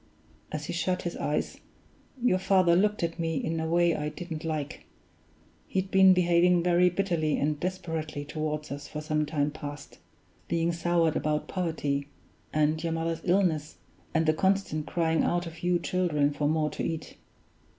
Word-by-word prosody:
As 155 -1 -4
he - - -4
shut 180 +1 -1
his 175 - -3
eyes, 150 - -2 0.6
your 235 -7 +2
father 185 -3 +4
looked 210 +1 +2
at 165 +1 -2
me 165 -1 -1
in 160 +2 -2
a 160 - -2
way 170 0 +3
I 150 0 -2
didn't 160 -1 -7
like. 155 -3 -4 0.8
He'd 190 0 -2
been 190 -1 +7
behaving 175 0 +4
very 180 0 +4
bitterly 170 -5 0
and 150 +1 0
desperately 160 -5 -3
toward 150 0 -3
us 145 +1 -6
for 150 - -6
some 155 0 -1
time 145 -1 0
past, 145 -1 -8 0.5
being 170 0 +1
soured 170 -1 +1
about 150 0 -1
poverty, 150 -6 -2 0.4
and 155 +1 +1
your 165 -1 -1
mother's 165 0 -2
illness, 175 -5 +1 0.3
and 160 0 +1
the 155 - +4
constant 190 -3 0
crying 165 -2 +1
out 175 0 0
of 165 0 -9
you 175 0 +2
children 155 -6 +1
for 145 0 0
more 155 -1 +1
to - - -4
eat. 160 -1 -4
165 Hz, 165 wpm, -28 LUFS, 155-175 Hz, 0.8 s, been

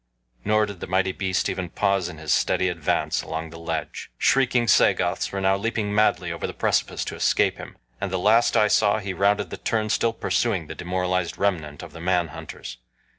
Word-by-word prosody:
Nor 110 0 +3
did 100 -3 -9
the - - -6
mighty 95 0 +1
beast 95 -1 -1
even 90 -2 -3
pause 95 -2 0
in 80 - -9
his 80 -1 -1
steady 95 - +2
advance 85 -4 -1
along 80 0 -5
the 85 - -10
ledge. 85 - -4
Shrieking 125 - +2
Sagoths 100 - +3
were 100 - -3
now 95 0 +3
leaping 105 -1 -2
madly 90 -5 +2
over 85 - -4
the - - -7
precipice - - 0
to - - -5
escape - - +2
him, - - -10 0.2
and 100 - -1
the 95 - 0
last 110 +5 +3
I 105 - +5
saw 105 0 +3
he 100 -3 -4
rounded 100 0 +1
the - - -5
turn 110 -1 -1
still 115 -1 +1
pursuing 110 -6 0
the - - -7
demoralized 90 0 -2
remnant 80 -8 -1
of - - -10
the 80 - -10
man 90 -1 +1
hunters. - - -9
95 Hz, 200 wpm, -24 LUFS, 90-105 Hz, 0.2 s, I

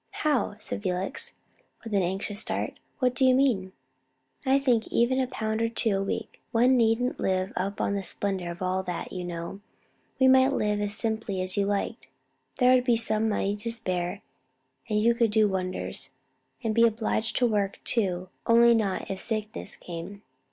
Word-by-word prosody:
"How?" 265 -9 +1
said - - -5
Felix, 195 - -2 0.5
with 225 -2 -6
an 200 - +3
anxious 195 +3 -2
start. - - -3 0.2
"What 250 -2 +2
do 265 - 0
you 255 -1 +6
mean?" 230 -9 +2 0.8
"I 265 +1 +5
think 250 -5 +2
even 245 +3 +2
of 255 -1 0
two - - -14
pounds 225 +2 -1
a 195 -3 +2
week: 195 - -4
one 245 +3 +4
needn't 235 +1 +2
live 185 0 0
up 195 +2 -2
to - - 0
the 200 0 -1
splendor 190 -1 -3
of 170 +2 -6
all 185 +1 0
that, 180 -2 -5
you 180 - -4
know; 175 +3 -6 0.6
we 260 - +6
might 260 +1 +6
live 210 -4 0
as 205 0 +1
simply 220 -3 -1
as 185 0 -1
you 200 -1 +1
liked: 200 -1 -2 0.5
there 250 0 +5
would 255 -1 +4
be 240 -3 +2
money 215 -2 +1
to 210 +3 -4
spare, 185 -4 -2 0.7
and 210 -1 +2
you 230 +2 +4
could 235 -1 +2
do 215 0 +4
wonders, 185 -2 -2 0.5
and 225 -1 0
be 230 +1 +6
obliged 225 0 -1
to 250 - +3
work 205 -4 0
too, 185 -5 0 0.2
only 235 +1 +6
not 210 -5 0
if 190 - -4
sickness 215 -2 -4
came. 180 +4 -8
215 Hz, 180 wpm, -27 LUFS, 190-235 Hz, 0.8 s, you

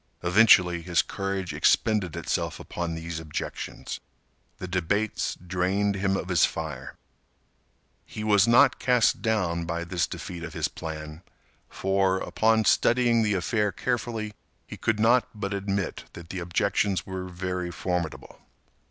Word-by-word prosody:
Eventually, 90 -2 +5
his 85 0 +2
courage 95 -2 -3
expended 105 -7 +2
itself - - -2
upon 85 -1 -4
these 80 0 -5
objections. 75 -2 -5 0.6
The 90 - -6
debates 95 +4 -1
drained 90 +3 0
him 95 0 0
of 95 - -5
his 85 -3 +3
fire. 75 -5 -2 1.1
He 105 - -7
was 105 -1 +4
not 120 +1 +5
cast 125 -2 +3
down 90 -7 0
by 85 0 -3
this 85 -3 -1
defeat 85 -1 -7
of 80 -2 -6
his - - 0
plan, 75 0 -7 0.5
for, 95 -1 +1
upon 110 +3 +2
studying 120 +3 +3
the 105 -2 +1
affair 105 +3 0
carefully, 110 +1 -2 0.3
he - - -8
could 110 -1 -1
not 115 +3 +4
but 100 0 -2
admit 100 -1 -2
that 85 -1 -11
the 95 - -4
objections 95 +2 0
were 95 -1 -5
very 90 0 -3
formidable. 85 -2 -4
95 Hz, 135 wpm, -26 LUFS, 85-105 Hz, 1.1 s, Eventually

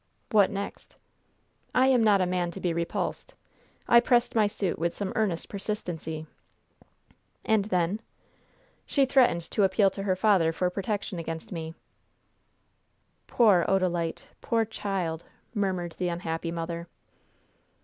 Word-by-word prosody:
"What 205 -3 +5
next?" 200 0 -6 0.8
"I 255 - +5
am 255 -3 +4
not 205 -3 +4
a - - +3
man 180 -1 -1
to - - -7
be 175 -2 -1
repulsed. 170 0 -3 0.5
I 235 - +7
pressed 240 0 +2
my 215 -2 +4
suit 200 -3 -2
with 170 +1 -1
some 200 -2 -3
earnest 195 -7 0
persistency." 175 -6 -5 1.2
"And 215 -2 +2
then?" 185 0 0 0.9
"She 275 -2 +3
threatened 255 -10 +3
to 205 - +2
appeal 195 +1 +3
to 195 - -6
her 195 -2 +1
father 185 -4 +3
for 180 +2 0
protection 195 -1 -3
against 165 +1 -6
me." 165 -2 -5 1.5
"Poor 205 -8 +4
Odalite! 175 -4 0 0.2
Poor 225 -1 +1
child!" 190 -6 -3 0.3
murmured 190 -5 -1
the 180 - 0
unhappy 170 -1 -3
mother. 170 0 -4
190 Hz, 130 wpm, -27 LUFS, 170-210 Hz, 1.5 s, I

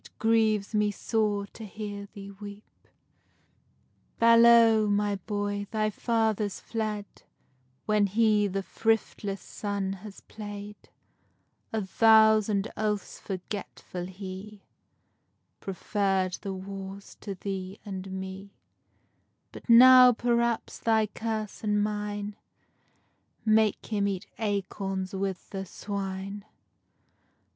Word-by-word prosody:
_ 210 -1 -1 1.6
Balow, 230 -1 +6
my 205 0 +1
boy, 205 +1 -3
thy 215 -1 0
father's 220 -3 0
fled, 215 -2 -3 0.8
When 210 -1 +3
he 210 0 +3
the 195 0 -3
thriftless 210 -2 -1
son 200 -2 -3
has 195 +1 -10
played; 205 -1 -9 0.8
Of 215 -3 -2
vows 220 -1 +6
and 200 0 0
oaths 210 -2 -2
forgetful, 185 -2 -6
he 195 +2 -9 1.0
Preferr'd 195 -1 -1
the 195 - -4
wars 195 +1 -8
to 200 -2 -5
thee 190 0 -5
and 190 -1 -6
me. 190 +1 -7 1.0
But - - -12
now, 250 +1 +9
perhaps, 235 0 0
thy 220 -1 +3
curse 215 0 -4
and 210 -1 +2
mine 210 0 -3 1.1
Make 215 -1 +3
him 205 -2 0
eat 195 -2 -3
acorns 195 -2 -2
with 190 -1 -4
the 195 -1 -4
swine. 195 0 -5
205 Hz, 90 wpm, -28 LUFS, 195-220 Hz, 1.6 s, now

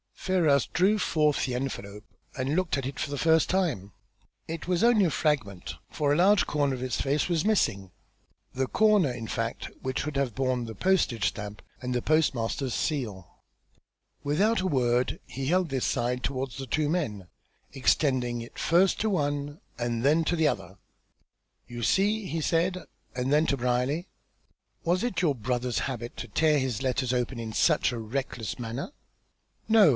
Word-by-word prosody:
Ferrars 160 -8 +2
drew 195 +5 +2
forth 150 -5 +2
the 125 - -2
envelope 105 -6 -5 0.3
and 135 +3 -1
looked 185 -4 +1
at 135 - -3
it 135 +1 -5
for - - -2
the 145 - -3
first 160 +1 +3
time. 160 - 0 0.6
It 165 0 -5
was 180 +1 +1
only 230 -4 +5
a - - +2
fragment, 135 - -1
for 145 -2 0
a - - +4
large 190 +4 +4
corner 145 -2 0
of 125 - -6
its 130 - -2
face 140 +2 +1
was 170 -3 +1
missing, 105 - +1 0.6
the 130 0 -1
corner, 210 -8 +3
in 120 -2 -6
fact, 115 +1 -3
which 130 0 -2
should 150 -1 -4
have 135 -5 0
borne 130 -2 0
the 110 -1 -7
postage 160 - +2
stamp 105 -1 -5 0.2
and 125 0 -3
the 125 - -1
postmaster's 135 -5 +1
seal. 110 - -2 1.0
Without 190 +9 +2
a 190 - 0
word 125 -5 +1
he 135 0 -5
held 180 +1 +2
this 130 -2 -1
side 125 +1 -1
towards 130 -2 -3
the 135 -1 -6
two 150 +5 0
men, 115 - -2 0.5
extending 125 -3 +1
it 115 - -11
first 180 +3 +3
to 220 - +1
one, 145 -4 -1 0.2
and 120 -1 -2
then 155 +4 +4
to 175 - +1
the 160 -2 +3
other. - - -3 0.9
"You 120 0 -7
see!" 205 - +2
he 165 -3 -3
said, 175 +3 0 0.3
and 125 +2 0
then 150 +2 +4
to 140 - +1
Brierly. 125 +7 0 0.8
"Was 180 +4 +1
it 215 -8 -1
your 155 -6 +2
brother's 120 +1 -1
habit 120 -3 -4
to 120 - -5
tear 150 +7 +3
his 130 -6 -2
letters 130 -1 0
open 125 0 -1
in 110 -1 -5
such 155 +1 +3
a 120 - -4
reckless 115 -3 -4
manner?" 120 - -4 0.8
"No. 220 -6 +6
140 Hz, 175 wpm, -27 LUFS, 120-165 Hz, 1.0 s, No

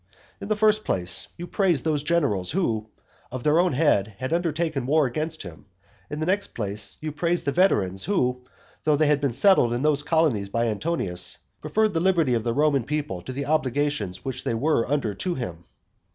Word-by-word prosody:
In - - -5
the 215 - +1
first 215 0 +3
place, 90 -2 -1
you 175 - -6
praised 175 - +1
those 150 -2 +1
generals 140 - 0
who, 115 - -1 0.4
of 125 -1 -5
their 150 +2 +4
own 180 -3 +2
head, 110 -8 +2
had 130 +5 -3
undertaken 160 -5 -1
war 155 +1 +3
against 155 +5 -3
him, 80 -6 -11 0.4
in 150 - -5
the 155 - -1
next 200 +3 -1
place, 100 -2 -4
you 155 0 -3
praised 170 +4 0
the 140 - +1
veterans 100 - +2
who, 125 -11 0 0.4
though 155 -1 +3
they 155 +2 +2
had 145 -1 +2
been 140 -3 +1
settled 125 - +4
in 120 +3 -2
those 150 -2 +3
colonies 150 -10 +1
by 115 +3 0
Antonius, 100 - -1 0.2
preferred 215 -1 +1
the 165 - +1
liberty 170 -7 +2
of 115 -2 0
the 120 - 0
Roman 140 0 +2
people 145 -9 -3
to 130 - -7
the 140 +2 -4
obligations 145 -9 -1
which 130 -1 -4
they 115 - -1
were 130 -1 +1
under 140 -8 0
to 175 - -3
him. 85 -9 -6
145 Hz, 195 wpm, -25 LUFS, 115-165 Hz, 0.4 s, their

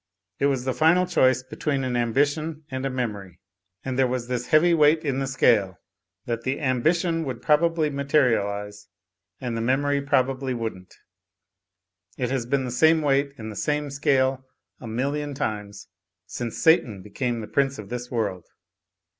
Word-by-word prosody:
It 140 - +3
was 130 -3 -1
the 130 - 0
final 165 +5 +4
choice 130 -8 +2
between 135 +1 -2
an 125 -1 -2
ambition 145 +6 0
and 130 +1 -2
a - - -2
memory. 105 -8 -4 0.5
And 130 0 -2
there 130 - +4
was 125 -1 -3
this 125 -1 -3
heavy 170 +3 +4
weight 155 0 +4
in 135 -2 0
the 135 - -2
scale: 105 -9 +2 0.5
that 115 -1 -3
the 130 +3 -2
ambition 165 +5 +1
would 130 -4 -6
probably 160 0 +2
material 140 -7 +2
ise, 100 0 -7 0.5
and 125 -3 -4
the 115 - -2
memory 140 +4 +1
probably 130 -1 0
wouldn't. 110 -6 -6 1.2
It 125 -1 -2
has 130 -3 -2
been 135 0 0
the 125 - -4
same 160 +5 +4
weight 140 0 +1
in 110 -1 -7
the - - -9
same 150 +4 -1
scale 135 -1 +1 0.4
a 120 - -9
million 140 +5 -2
times, 105 -4 -4 0.4
since 120 -2 -5
Satan 115 - +3
became 120 +3 -3
the 105 - -7
prince 140 -1 0
of 105 - -9
this 125 0 -5
world. 100 -7 -3
130 Hz, 165 wpm, -24 LUFS, 115-145 Hz, 1.2 s, final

